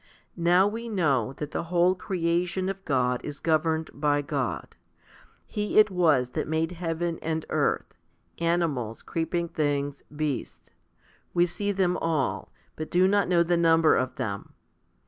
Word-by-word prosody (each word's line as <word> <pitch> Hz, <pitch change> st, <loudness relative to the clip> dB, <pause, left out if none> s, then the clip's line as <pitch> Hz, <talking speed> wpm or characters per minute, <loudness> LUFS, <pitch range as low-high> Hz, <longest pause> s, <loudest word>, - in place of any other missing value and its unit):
Now 175 Hz, +3 st, +4 dB
we 230 Hz, +3 st, -4 dB
know 140 Hz, -, +1 dB
that 150 Hz, +2 st, -6 dB
the -, -, -3 dB
whole 175 Hz, +1 st, +3 dB
creation 180 Hz, 0 st, -1 dB
of 195 Hz, 0 st, -5 dB
God 125 Hz, -3 st, +1 dB
is 145 Hz, -1 st, -6 dB
governed 160 Hz, 0 st, 0 dB
by 145 Hz, 0 st, +1 dB
God. 140 Hz, -4 st, -3 dB, 0.7 s
He 210 Hz, 0 st, -2 dB
it 215 Hz, -1 st, +7 dB
was 155 Hz, -9 st, +3 dB
that -, -, -3 dB
made 160 Hz, +2 st, 0 dB
heaven 170 Hz, -1 st, -3 dB
and 160 Hz, 0 st, -2 dB
earth, -, -, 0 dB, 0.5 s
animals, 165 Hz, -10 st, -1 dB
creeping 170 Hz, +1 st, -2 dB
things, 145 Hz, -3 st, -1 dB
beasts. 150 Hz, -3 st, -4 dB, 0.6 s
We 175 Hz, 0 st, +5 dB
see 200 Hz, +4 st, -2 dB
them 185 Hz, -2 st, +1 dB
all, 160 Hz, -4 st, -1 dB, 0.2 s
but 155 Hz, -, -5 dB
do 180 Hz, +1 st, +4 dB
not 200 Hz, 0 st, +2 dB
know 175 Hz, -1 st, +4 dB
the 175 Hz, 0 st, +1 dB
number 165 Hz, -1 st, +5 dB
of 130 Hz, 0 st, -1 dB
them. 100 Hz, -2 st, -5 dB
165 Hz, 145 wpm, -27 LUFS, 145-180 Hz, 0.7 s, it